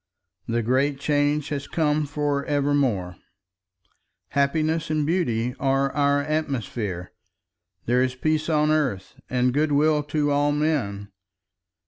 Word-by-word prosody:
The 115 0 0
great 135 +4 +1
Change 145 0 +1
has 140 -2 -4
come 150 -2 0
for 145 -1 -1
ever 145 -1 +1
more, 100 -11 0 1.1
happiness 155 +3 0
and 155 -1 0
beauty 125 -8 0
are 135 0 +1
our 145 -1 +2
atmosphere, 120 - -3 0.7
there 125 +2 +2
is 130 0 0
peace 155 +4 0
on 150 -1 +2
earth 135 -12 -1
and 125 0 +1
good 150 +2 +1
will 150 +1 +3
to 145 0 -1
all 145 +1 +2
men. 120 -10 -1
145 Hz, 125 wpm, -24 LUFS, 125-150 Hz, 1.1 s, will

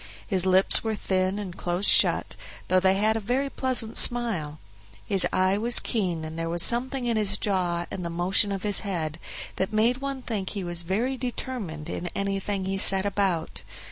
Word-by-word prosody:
His 190 -3 0
lips 185 +1 +6
were 220 -1 -2
thin 190 -1 -1
and 195 -4 -7
close 175 +2 -1
shut, - - +4 0.3
though 185 - +3
they 190 +1 +2
had 215 +2 +1
a - - -1
very 255 +6 -2
pleasant 250 -4 -2
smile; 210 -12 0 0.5
his 195 -2 +4
eye 185 +2 +1
was 240 +2 +5
keen, 180 -8 -3
and 160 +1 -8
there 165 0 -3
was 170 0 +2
something 255 +2 +1
in 235 -2 -1
his 210 -2 -1
jaw 175 -4 -2
and 180 - -6
the 170 - -4
motion 180 +5 +2
of 195 -1 -5
his 205 -1 +4
head 165 -6 -5 0.4
that 190 - -2
made 225 +3 +1
one 275 -1 -6
think 200 -5 -4
he 200 -2 -5
was 175 -1 -3
very 220 +10 -2
determined 240 - -5
in 175 - -5
anything 195 0 -3
he 195 0 -2
set 195 0 +5
about. 195 -5 -2
195 Hz, 190 wpm, -25 LUFS, 180-225 Hz, 0.5 s, lips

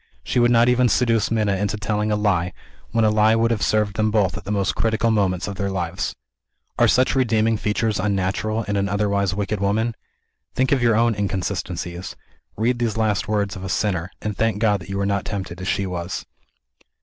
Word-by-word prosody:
She - - 0
would 120 0 +4
not 120 0 +4
even 125 0 +3
seduce 115 -3 +2
Minna 105 -3 +1
into 105 +2 -1
telling 105 +1 -1
a - - +2
lie, 90 -4 0 0.4
when 115 -1 +2
a 105 - +4
lie 110 +1 +4
would 115 +1 +2
have 115 - -1
served 105 -1 +1
them 110 0 +2
both 105 -3 +1
at 95 -1 -8
the 100 - -4
most 100 -2 0
critical 115 0 +1
moment 95 -4 +1
of 100 -1 -5
their 100 -1 -1
lives. 90 -2 -3 0.6
Are - - +5
such 130 +1 +3
redeeming 115 -3 +2
features 110 0 -1
unnatural 100 +3 -1
in 100 -1 -2
an 100 0 0
otherwise 100 -1 0
wicked 105 0 -2
woman? 110 +4 0 0.6
Think 130 +1 +1
of 135 -3 +3
your 115 -2 +3
own 115 +1 +3
"inconsistencies." 90 -3 -3 0.4
Read 120 +3 +1
these 115 -3 -1
last 110 -3 0
words 105 -1 -1
of 95 - -8
a 95 - -5
sinner 90 -3 -1
and 105 -1 -2
thank 110 0 0
God 105 -2 +2
that 90 - -12
you 100 - -3
were 100 - 0
not 100 0 0
tempted 95 -3 -5
as 95 - -5
she 100 - 0
was 85 -7 -4
105 Hz, 210 wpm, -22 LUFS, 95-110 Hz, 0.6 s, Are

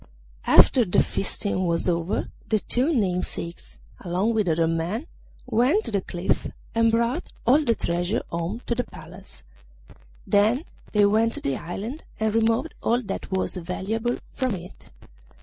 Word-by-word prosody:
After 250 - +7
the 185 - +3
feasting 190 -1 -1
was 170 +1 +1
over 170 +2 -1 0.2
the 220 - +3
two 250 +8 +1
namesakes, 180 - -2 0.2
along 190 +5 0
with 215 -4 +1
other 165 0 +2
men, 165 - -1 0.4
went 255 - +3
to - - -3
the 200 -2 +1
cliff 175 0 -1 0.3
and 230 0 +4
brought 235 +8 0
all 280 +6 +5
the 235 -5 +2
treasure 175 +5 -1
home 170 +8 -3
to - - 0
the 245 +1 0
Palace. 180 0 -13 0.8
Then 220 - +3 0.3
they 210 -1 +4
went 220 +3 +3
to - - -3
the 140 - -1
island 210 - -5 0.2
and 220 -1 +1
removed 225 +7 +1
all 240 +2 +1
that 195 -2 -5
was 190 0 -1
valuable 210 +7 -2 0.2
from 255 -6 -1
it. 180 0 -10
210 Hz, 150 wpm, -25 LUFS, 180-235 Hz, 0.8 s, After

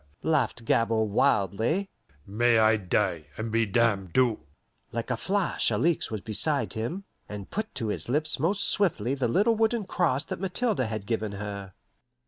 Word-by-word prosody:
laughed 140 -7 0
Gabord 110 -2 +1
wildly. 125 - +1 0.3
"May 115 +3 +2
I 110 0 +5
die 85 -5 -1
and 110 0 -4
be 115 0 +2
damned 100 -4 +1
to 125 -4 +3 0.3
" - - -45
Like 115 +2 -4
a - - +1
flash 195 - 0
Alixe 170 -1 +1
was 110 -2 -4
beside 110 - +1
him, 120 - -4 0.3
and 105 -2 -8
put 215 +1 -4
to 110 - -2
his 105 - -2
lips 150 +3 0
most 190 +8 +2
swiftly 135 - +2
the 135 -3 0
little 205 - +3
wooden 225 -1 +1
cross 165 -7 0
that - - -6
Mathilde 205 +4 -1
had 110 -5 -2
given 110 -1 -2
her. 100 -2 -7
115 Hz, 165 wpm, -27 LUFS, 110-165 Hz, 0.3 s, I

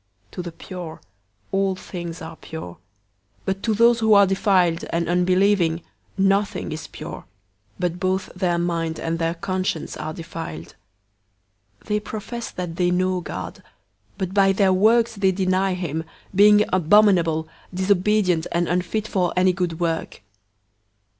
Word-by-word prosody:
001:015 - - -35
To - - -5
the 175 -1 -6
pure, 170 -1 -8 0.5
all 195 -1 +1
things 175 -2 -7
are 160 0 -8
pure; 90 - -8 0.7
but 190 0 -2
to 220 -2 0
those 235 +2 +5
who 220 -1 +5
are 200 0 +7
defiled 185 -3 +2
and 170 0 -1
unbelieving, 180 -1 +2 0.3
nothing 195 -2 +1
is 155 0 -6
pure; - - -8 0.5
but 175 0 -2
both 185 0 0
their 180 -2 0
mind 165 -2 -1
and 165 0 -2
their 165 0 0
conscience 185 -2 -2
are 155 - -5
defiled. 155 - -7 1.1
001:016 - - -24
They 210 0 +2
profess 220 +3 -6
that 175 -2 -6
they 180 -1 +2
know 185 0 +1
God, - - -7 0.6
but 190 -2 -3
by 195 -1 +5
their 190 -1 +3
works 225 +3 +3
they 195 -1 +3
deny 185 0 +1
him, 160 -3 -3 0.3
being 210 +2 +6
abominable, 175 -3 +4 0.2
disobedient, 185 -2 +2
and 170 0 +1
unfit 180 +5 -1
for 180 -4 0
any 185 0 +4
good 175 -2 -2
work. 165 - -2
185 Hz, 145 wpm, -23 LUFS, 170-195 Hz, 1.1 s, are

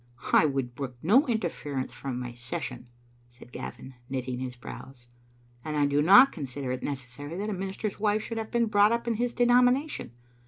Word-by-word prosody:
"I 155 - +6
would 135 -3 -2
brook 130 0 -5
no 240 - +5
interference 150 - -2
from 125 0 -5
my 125 -1 -5
session," 125 0 -6 0.4
said 120 0 -16
Gavin, 125 +2 -8 0.2
knitting 130 -1 -3
his 125 -1 -5
brows, 125 0 -11 0.3
" 120 0 -32
and 155 -1 -3
I 145 - +3
do 145 +1 +2
not 200 - +8
consider 135 -3 -5
it 130 - -3
necessary 140 +3 -6
that 210 +2 -2
a - - -1
minister's 195 +2 -4
wife 210 0 +1
should 225 +1 -4
have 220 - -5
been 235 -1 +2
brought 210 -1 +4
up 235 0 -1
in 235 - +2
his 240 +2 -2
denomination. 245 - +3
145 Hz, 190 wpm, -28 LUFS, -, 0.4 s, not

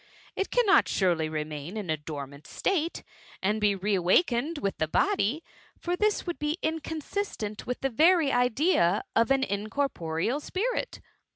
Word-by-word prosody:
It 390 - -1
cannot 410 -5 +4
surely 170 -5 +1
remain 155 +4 -5
in 195 -6 -3
a - - +2
dormant 145 -1 -8
state, 340 -4 -1 0.4
and 210 +3 0
be 205 -1 +3
re>> 200 +2 -1
awakened 240 - +2
with 200 -8 -3
the 155 - +1
body; 315 - +1 0.3
for 350 0 -2
this 425 +2 +1
would 345 -2 -4
be 300 +2 -1
ioconsistrot 315 - -3
with 250 - -3
the 270 - 0
very 320 +3 +4
idea 245 - +2
of 230 0 +3
an 270 0 +3
incorporeal 210 - -1
s^rit." 475 +10 -2
240 Hz, 150 wpm, -28 LUFS, -, 0.4 s, cannot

